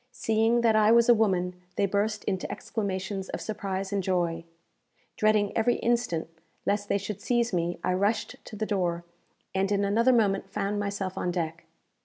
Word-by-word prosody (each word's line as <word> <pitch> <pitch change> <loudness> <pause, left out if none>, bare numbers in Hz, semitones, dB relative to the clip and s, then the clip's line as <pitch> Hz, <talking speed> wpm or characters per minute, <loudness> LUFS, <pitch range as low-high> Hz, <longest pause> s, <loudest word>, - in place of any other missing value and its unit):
Seeing 225 0 +2
that 225 -2 +4
I 215 0 +5
was 235 +1 +5
a - - +10
woman, 185 -5 +1 0.2
they 200 - +2
burst 205 +2 -1
into 190 -2 -2
exclamations 195 -2 -3
of - - -4
surprise 195 -2 -4
and 200 - +1
joy. 175 -3 -1 0.7
Dreading 215 -1 +2
every 235 +2 +3
instant 235 -9 0 0.4
lest 205 0 0
they - - +3
should 200 0 -5
seize 235 0 +1
me, 175 0 0
I 185 - +1
rushed 200 +4 0
to - - -9
the 215 +1 -2
door, 175 -5 -1 0.5
and 195 +1 0
in 200 0 +2
another 230 +5 +3
moment 200 -5 +2
found 205 +1 -2
myself 200 -2 -3
on 180 - -1
deck. 170 -2 -3
200 Hz, 175 wpm, -27 LUFS, 185-220 Hz, 0.7 s, a